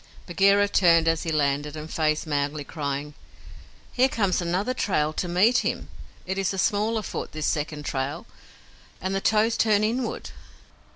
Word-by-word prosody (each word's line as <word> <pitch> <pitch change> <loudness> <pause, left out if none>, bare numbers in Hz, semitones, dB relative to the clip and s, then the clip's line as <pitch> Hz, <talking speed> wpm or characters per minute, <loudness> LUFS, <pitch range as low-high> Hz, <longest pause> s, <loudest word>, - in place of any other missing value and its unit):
Bagheera 200 +3 +3
turned 170 -4 +4
as 165 0 +2
he 165 - -3
landed, 145 0 0
and 155 +1 -7
faced 155 -1 0
Mowgli, 145 0 -2
crying, 145 -1 -4 0.8
"Here 260 +1 +3
comes 195 -7 0
another 185 +8 -1
trail 155 -11 0
to 180 - -3
meet 195 +8 +4
him. - - -3 0.4
It 190 +1 -3
is 195 0 0
a - - -6
smaller 215 +3 +1
foot, - - -5
this 155 -1 -3
second 150 0 -2
trail, 140 +8 -3 0.7
and 190 +1 -3
the 195 - -1
toes 220 +2 +2
turn 215 -2 +3
inward." 235 +3 -2
175 Hz, 160 wpm, -25 LUFS, 150-205 Hz, 0.8 s, turned